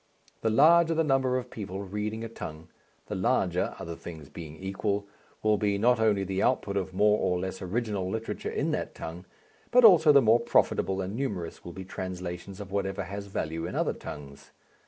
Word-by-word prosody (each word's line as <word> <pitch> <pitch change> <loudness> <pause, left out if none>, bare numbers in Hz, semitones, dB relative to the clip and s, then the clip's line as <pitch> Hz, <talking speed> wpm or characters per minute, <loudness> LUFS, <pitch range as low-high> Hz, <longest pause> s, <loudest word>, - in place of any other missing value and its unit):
The 110 - +1
larger 165 +7 +5
the 165 - +3
number 135 -3 +2
of 125 -1 -5
people 100 -2 -5
reading 105 +3 -4
a - - -3
tongue, 80 -6 -8 0.4
the - - -6
larger 95 -3 +1
other 85 0 -6
things 80 -4 -10
being 80 0 -9
equal 100 +2 -2 0.4
will 110 -1 +3
be 100 -2 +1
not 120 +3 +3
only 105 -3 +3
the 95 0 -2
output 105 -6 +1
of 95 -1 -1
more 105 +3 +3
or 90 -1 +1
less 95 +1 -4
original 100 -1 -2
literature 110 +3 -4
in - - -1
that - - -3
tongue, 85 +3 -7 0.4
but 250 -1 +6
also 165 -7 +8
the 140 - +8
more 115 -2 +5
profitable 95 -4 +1
and 95 +3 -4
numerous 100 -11 -4
will 85 - -8
be 95 -1 -8
translations 95 +1 -6
of 100 -2 -8
whatever 100 0 -1
has 100 +2 -6
value 80 -3 -3
in 90 - -6
other - - +1
tongues. 70 -2 -10
100 Hz, 190 wpm, -28 LUFS, 90-115 Hz, 0.4 s, also